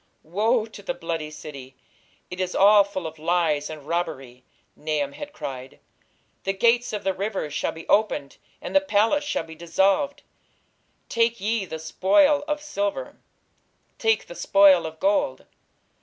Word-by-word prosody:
"Woe 215 +7 +1
to 220 -2 -12
the 200 - -4
bloody 165 -3 -4
city! 140 -4 -10 0.6
it 180 - -6
is 185 -1 -2
all 205 +1 +7
full 195 -3 -6
of 160 0 -7
lies 160 -3 +1
and 150 -2 -9
robbery", 135 -7 -3 0.3
Nahum 150 -2 -2
had 290 - -8
cried. 135 - -7 0.3
"... - - -42
The 195 - 0
gates 235 +4 +2
of 210 -2 -4
the 190 - +1
rivers 195 -6 -3
shall - - -1
be 165 - -11
opened, 175 -10 +1 0.3
and - - -6
the 290 - +6
palace 285 +2 +2
shall 295 - -2
be 160 0 -11
dissolved.... 190 - +1 0.8
Take 235 0 +1
ye 210 +1 -1
the 160 - -6
spoil 280 - +3
of 300 -1 -2
silver, 305 +9 -3 0.8
take 225 -1 +2
the - - -10
spoil 185 0 +5
of 160 0 -10
gold.... 195 -9 +1
190 Hz, 155 wpm, -24 LUFS, 160-225 Hz, 0.8 s, all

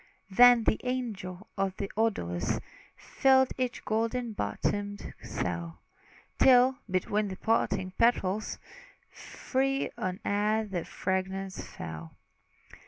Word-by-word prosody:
Then 245 +3 +7
the 220 - +1
angel 215 -7 -4
of 195 -1 0
the 200 - -4
odors 90 - 0 0.4
Filled 265 -1 +3
each 255 -2 -3
golden 230 +2 -1
bottomed 205 0 -3
cell, 85 -1 -4 0.6
Till, 260 +1 +6
between 205 +3 0
the 190 - -5
parting 195 -4 0
petals, 215 -3 +1 0.5
Free 270 +1 -2
on 185 -3 -2
air 210 +2 +1
the 185 -5 -4
fragrance 190 0 -3
fell. 80 0 -8
205 Hz, 105 wpm, -29 LUFS, 185-245 Hz, 0.6 s, Then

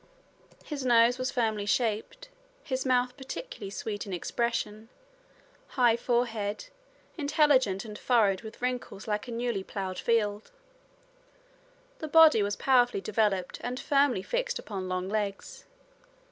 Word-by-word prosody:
His 290 -3 -5
nose 240 0 +4
was 255 +1 -1
firmly 220 -5 -1
shaped, 235 - -1 0.3
his 260 -2 -2
mouth 250 -1 +2
particularly 270 - -7
sweet 205 +1 -5
in 195 - -5
expression, 220 +2 -2 0.9
high 240 -3 +5
forehead, 235 - -1 0.5
intelligent 280 -9 +2
and 210 -1 -8
furrowed 210 -6 +2
with 225 +1 -11
wrinkles 250 -5 -3
like 210 +3 -2
a - - -6
newly 235 -4 -2
plowed 190 -1 -5
field. 210 -2 0 1.5
The 315 - -4
body 315 -6 +7
was 205 0 0
powerfully 245 -5 +3
developed 205 -3 0
and 250 +1 -4
firmly 275 -9 +2
fixed - - -1
upon 195 - -6
long 185 0 -2
legs. 205 -1 -4
230 Hz, 125 wpm, -29 LUFS, 205-255 Hz, 1.5 s, body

